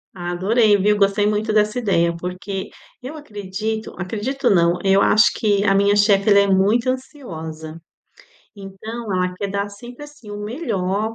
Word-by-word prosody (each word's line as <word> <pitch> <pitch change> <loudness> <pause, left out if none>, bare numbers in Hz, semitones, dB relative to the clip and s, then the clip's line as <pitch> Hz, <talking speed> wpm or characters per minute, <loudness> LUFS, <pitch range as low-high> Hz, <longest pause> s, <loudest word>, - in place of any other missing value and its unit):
Adorei, 190 +5 +2
viu? 210 +2 +2
Gostei 200 +1 +2
muito 215 +1 -1
dessa 210 +2 +2
ideia, 170 -7 +1
porque 185 +2 -6 0.3
eu 260 +5 -8
acredito 215 -4 -5
acredito 235 +8 -2
não, 170 -2 +3
eu 195 0 +4
acho 210 0 +4
que 205 -2 +1
a 195 -1 +3
minha 200 +1 +3
chefe 205 0 +3
ela 200 - +6
é 200 - +3
muito 205 +6 +2
ansiosa, 160 - -7 0.8
então 205 +3 -7
ela 180 0 -1
quer 200 +2 -4
dar 200 +1 -2
sempre, 240 +7 -11
assim, 295 -8 -14
o 205 - -6
melhor 215 - -2
205 Hz, 155 wpm, -20 LUFS, 190-220 Hz, 0.8 s, ela